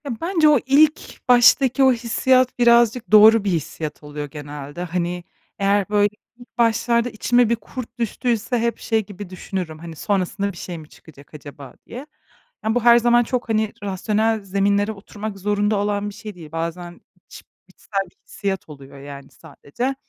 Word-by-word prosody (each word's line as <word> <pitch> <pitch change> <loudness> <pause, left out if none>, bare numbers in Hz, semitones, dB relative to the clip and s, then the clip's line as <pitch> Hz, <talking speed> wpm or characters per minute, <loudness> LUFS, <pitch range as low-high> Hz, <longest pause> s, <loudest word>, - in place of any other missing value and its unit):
Ya, 280 - -4
bence 330 -3 +3
o 295 -3 +5
ilk 295 +4 +2
baştaki 250 +2 +5
o 260 -1 +6
hissiyat 250 +2 +1
birazcık 235 -1 +3
doğru 215 0 +7
bir 205 - -1
hissiyat 155 -2 -4
oluyor 150 0 -6
genelde. 145 +2 -8
Hani, 175 0 -3 0.4
eğer, 200 0 +1
böyle, 205 0 +3 0.3
ilk 245 -1 -18
başlarda 235 +1 +2
içime 240 +1 +2
bir 235 - +2
kurt 240 +1 -9
düştüyse 235 +1 -1
hep 235 0 -1
şey 220 -2 -1
gibi 205 -2 -10
düşünürüm, 180 -3 -6
hani, 165 0 -9
"Sonrasında 200 +3 -1
bir 180 - -14
şey 175 -1 -7
mi 155 -1 -12
çıkacak 145 -2 -18
acaba?" 145 -2 -11
diye. 255 +4 -9 0.6
Yani, 220 +1 0
bu 245 - 0
her 235 0 +7
zaman 240 0 +3
çok, 245 0 -3
hani, 215 -1 0
rasyonel 215 +3 -1
zeminlere 200 +2 +1
oturmak 210 0 -8
zorunda 205 +2 0
olan 205 0 -1
bir - - -11
şey 215 -2 -9
değil. 160 -4 -12
Bazen 170 +2 -5 0.3
iç - - -13 0.2
içsel 195 -2 -4
bir - - -35
hissiyat 195 -4 -4
oluyor, 140 -1 -12
yani, 140 0 -10
sadece. 170 - -6
205 Hz, 165 wpm, -21 LUFS, 175-235 Hz, 0.6 s, doğru